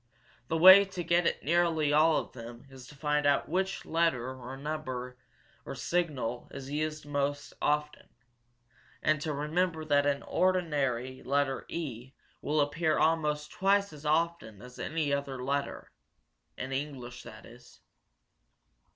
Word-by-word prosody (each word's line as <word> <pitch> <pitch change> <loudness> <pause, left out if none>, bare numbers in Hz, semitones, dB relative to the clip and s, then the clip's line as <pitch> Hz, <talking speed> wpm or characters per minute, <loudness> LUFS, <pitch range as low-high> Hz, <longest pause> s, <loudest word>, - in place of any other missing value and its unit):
The 165 - 0
way 190 +4 +10
to 190 -2 -6
get 170 +1 +2
at - - -1
nearly 160 -2 +2
all 155 +1 +5
of - - -3
them 120 0 -10
is 130 -1 -12
to 150 - -13
find 150 0 0
out 140 - +2
which 190 +3 -2
letter 145 -7 0
or 130 +1 -8
number 130 -4 -5 0.5
or - - -7
symbol 145 -9 -2
is 135 0 -8
used 155 0 -2
most 145 0 -2
often, 150 0 -1 0.9
and 155 -1 +2
to 155 - -2
remember 160 +3 -1
that 145 -1 +3
in 145 - +3
an - - -14
ordinary 140 -9 0
letter 140 0 -1
E 130 -6 -5 0.3
will 150 0 +1
appear 155 +2 +1
almost 150 -2 +1
twice 200 -1 +2
as 150 -1 -12
often 155 - 0
as 125 0 -12
any 155 -3 -1
other 140 -2 -3
letter 140 +2 -3 0.7
in 130 +1 -5
English, 135 -3 -5
that 110 0 -12
is." 120 +1 -16
150 Hz, 145 wpm, -30 LUFS, 135-160 Hz, 0.9 s, way